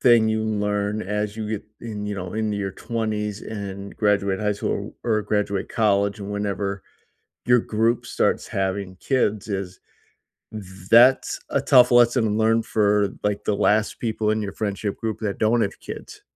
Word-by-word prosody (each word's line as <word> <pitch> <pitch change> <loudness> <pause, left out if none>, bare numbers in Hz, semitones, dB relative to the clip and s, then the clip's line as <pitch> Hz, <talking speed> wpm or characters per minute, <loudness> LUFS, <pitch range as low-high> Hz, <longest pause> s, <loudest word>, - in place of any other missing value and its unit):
thing 115 -3 +5
you 110 0 0
learn 105 -1 -1
as 105 +2 -2
you 110 -1 -4
get 110 -1 -4 0.2
in, 105 -3 -5
you 105 - -3
know, 90 -2 -6
into 110 -2 -1
your 95 -2 -3
20s 105 -2 -3
and 100 -2 -7
graduate 100 -2 +1
high 105 -1 +1
school 100 - -3
or 110 -3 +1
graduate 100 -2 -1
college 100 -1 +1
and 100 0 -6
whenever 100 -1 -2 0.6
your 125 0 +5
group 115 +2 0
starts - - 0
having 95 -1 -2
kids 110 -3 0
is 95 -2 -4 1.1
that's 125 +3 +6
a - - +1
tough 125 -1 +6
lesson 120 -3 +4
learned 115 +1 +3
for, 105 -2 +2
like, 105 -1 -1
the 105 - 0
last 105 +1 +1
people 110 -2 -1
in 110 0 +1
your 100 -2 -4
friendship 100 -1 -3
group 110 -2 -3
that 105 -3 -3
don't 115 +2 +3
have 100 - -4
kids, - - -9
105 Hz, 165 wpm, -23 LUFS, 100-110 Hz, 1.1 s, that's